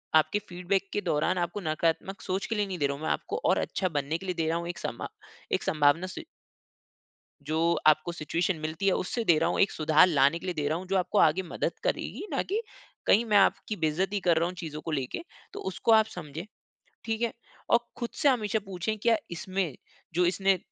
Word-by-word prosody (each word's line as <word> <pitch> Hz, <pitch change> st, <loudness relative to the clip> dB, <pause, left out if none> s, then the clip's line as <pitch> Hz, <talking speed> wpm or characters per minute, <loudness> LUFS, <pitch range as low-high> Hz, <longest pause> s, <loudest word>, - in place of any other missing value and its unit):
आपके 160 Hz, +6 st, +4 dB
फ़ीडबैक 185 Hz, +2 st, -1 dB
के 205 Hz, -, 0 dB
दौरान 175 Hz, +2 st, +1 dB
आपको 175 Hz, +3 st, -2 dB
नकारात्मक 165 Hz, +4 st, -1 dB
सोच 190 Hz, +1 st, -2 dB
के 225 Hz, -, -1 dB
लिए 210 Hz, -1 st, +1 dB
नहीं 190 Hz, -2 st, -4 dB
दे 145 Hz, -, +3 dB
रहा 140 Hz, -, -2 dB
हूँ 155 Hz, -, -10 dB
मैं -, -, -1 dB
आपको -, -, -2 dB
और -, -, +4 dB
अच्छा 185 Hz, -, -1 dB
बनने 145 Hz, 0 st, -1 dB
के 190 Hz, -, -10 dB
लिए 180 Hz, -1 st, -2 dB
दे 160 Hz, -1 st, 0 dB
रहा 165 Hz, +1 st, +1 dB
हूँ 170 Hz, 0 st, -4 dB
एक 175 Hz, -, -5 dB
सम्भव -, -, -4 dB, 0.5 s
एक -, -, -3 dB
संभावना 155 Hz, +4 st, +3 dB
स 185 Hz, -, -7 dB, 1.3 s
जो 155 Hz, +1 st, 0 dB, 0.3 s
आपको 155 Hz, +2 st, +4 dB
सिचुएशन 170 Hz, +3 st, -1 dB
मिलती 155 Hz, +5 st, -3 dB
है 195 Hz, -, +5 dB
उससे 230 Hz, +7 st, -1 dB
दे 170 Hz, -6 st, +5 dB
रहा 165 Hz, +2 st, +2 dB
हूँ, -, -, 0 dB
एक 195 Hz, -, +4 dB
सुधार 155 Hz, +2 st, +5 dB
लाने 150 Hz, -1 st, +3 dB
के -, -, -9 dB
लिए 180 Hz, -, -1 dB
दे 150 Hz, -2 st, -1 dB
रहा 155 Hz, +2 st, 0 dB
हूँ, 185 Hz, -, -8 dB
जो 195 Hz, +1 st, 0 dB
आपको 180 Hz, -1 st, +1 dB
आगे 165 Hz, +4 st, +4 dB
मदद 175 Hz, -, -3 dB
करेगी -, -, -2 dB
ना 275 Hz, -, +1 dB
कि 420 Hz, +5 st, -2 dB, 0.4 s
कहीं 225 Hz, +4 st, +5 dB
मैं 215 Hz, -3 st, +2 dB
आपकी 205 Hz, +2 st, +2 dB
बेइज़्ज़ती 190 Hz, +5 st, 0 dB
कर 175 Hz, -3 st, +3 dB
रहा 165 Hz, -, +2 dB
हूँ, 180 Hz, -, -6 dB
चीज़ों 155 Hz, -4 st, -6 dB
को 165 Hz, -, -5 dB
लेके, 135 Hz, -, -2 dB, 0.3 s
तो -, -, -6 dB
उसको 225 Hz, +4 st, +1 dB
आप 220 Hz, -1 st, +6 dB
समझें, 160 Hz, -6 st, -7 dB, 0.6 s
ठीक 225 Hz, 0 st, -2 dB
है। 235 Hz, -, +1 dB, 0.4 s
और 235 Hz, -, +7 dB, 0.2 s
ख़ुद 235 Hz, -1 st, -3 dB
से 290 Hz, -, +6 dB
हमेशा 220 Hz, -5 st, +2 dB
पूछें 195 Hz, +3 st, -2 dB
क्या 230 Hz, +2 st, +3 dB
इसमें 185 Hz, -2 st, -2 dB, 0.4 s
जो 180 Hz, +2 st, +3 dB
इसने 190 Hz, +2 st, +2 dB
180 Hz, 225 wpm, -28 LUFS, 160-195 Hz, 1.3 s, और